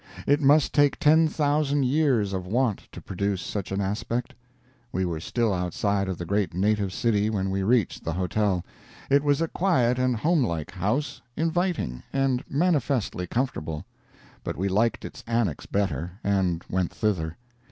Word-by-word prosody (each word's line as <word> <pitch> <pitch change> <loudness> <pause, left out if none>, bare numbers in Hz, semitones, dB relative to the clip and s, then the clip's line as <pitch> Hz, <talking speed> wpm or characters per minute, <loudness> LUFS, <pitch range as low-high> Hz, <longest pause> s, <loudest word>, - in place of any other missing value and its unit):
It 145 +2 +3
must 145 +1 +4
take 145 -2 +4
ten 160 +2 +5
thousand 145 -2 +1
years 125 -8 +2
of 95 -1 -3
want 115 0 0
to - - -9
produce 100 0 -2
such 95 0 -4
an 95 - -1
aspect. 115 +5 -2 0.6
We 95 0 0
were 85 -3 -2
still 115 +5 0
outside 95 +2 -1
of 95 - -3
the 85 - -5
great 100 -1 0
native 100 0 +1
city 105 0 +1
when 95 -3 -1
we 95 0 -1
reached 110 0 +1
the 80 - -2
hotel. 95 +1 0 0.5
It 140 +1 +5
was 145 +1 +2
a 165 - +1
quiet 130 -10 +1
and 130 -1 +2
homelike 110 - 0
house, 105 - -2 0.2
inviting, 165 - -1
and 135 -1 +1
manifestly 140 - 0
comfortable. 85 - -2 0.6
But - - -4
we 95 +3 0
liked 110 +5 +1
its - - -9
annex 115 -10 -1
better, 95 -4 -1
and 95 -4 +1
went 90 -2 -1
thither. 85 -7 -1
105 Hz, 160 wpm, -26 LUFS, 95-135 Hz, 0.6 s, ten